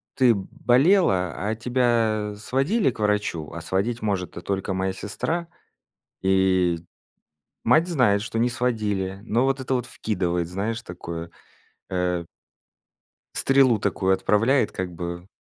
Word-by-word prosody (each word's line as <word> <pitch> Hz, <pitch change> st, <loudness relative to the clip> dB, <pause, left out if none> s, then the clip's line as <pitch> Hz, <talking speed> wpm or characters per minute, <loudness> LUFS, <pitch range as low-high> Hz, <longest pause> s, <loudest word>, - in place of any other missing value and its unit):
ты 125 Hz, -3 st, +5 dB
болела, 120 Hz, -, +2 dB
а 105 Hz, +4 st, -2 dB
тебя 115 Hz, -3 st, +1 dB
сводили 135 Hz, -, +1 dB
к 115 Hz, -, -15 dB
врачу?" 105 Hz, -7 st, -1 dB
А 85 Hz, -, -6 dB
сводить 100 Hz, +8 st, -1 dB
может-то 95 Hz, -4 st, -2 dB
только 95 Hz, +1 st, -2 dB
моя 95 Hz, 0 st, 0 dB
сестра, 165 Hz, -, -3 dB, 0.8 s
и 95 Hz, -2 st, +3 dB, 0.9 s
мать 160 Hz, +3 st, +4 dB
знает, 120 Hz, -, +3 dB
что 110 Hz, +1 st, -4 dB
не 120 Hz, +2 st, +3 dB
сводили, 105 Hz, -6 st, -1 dB
но 115 Hz, +3 st, +1 dB
вот 135 Hz, 0 st, +1 dB
это 130 Hz, 0 st, -1 dB
вот 125 Hz, -2 st, -1 dB
вкидывает, 90 Hz, -8 st, -2 dB
знаешь, 105 Hz, +6 st, -3 dB
такое, 85 Hz, -3 st, -7 dB, 0.6 s
э 90 Hz, -2 st, 0 dB, 1.1 s
стрелу 135 Hz, -4 st, +4 dB
такую 95 Hz, -1 st, +1 dB
отправляет 105 Hz, +6 st, +2 dB
как 95 Hz, -1 st, -4 dB
бы. 85 Hz, +1 st, -6 dB
105 Hz, 125 wpm, -24 LUFS, 95-125 Hz, 1.1 s, ты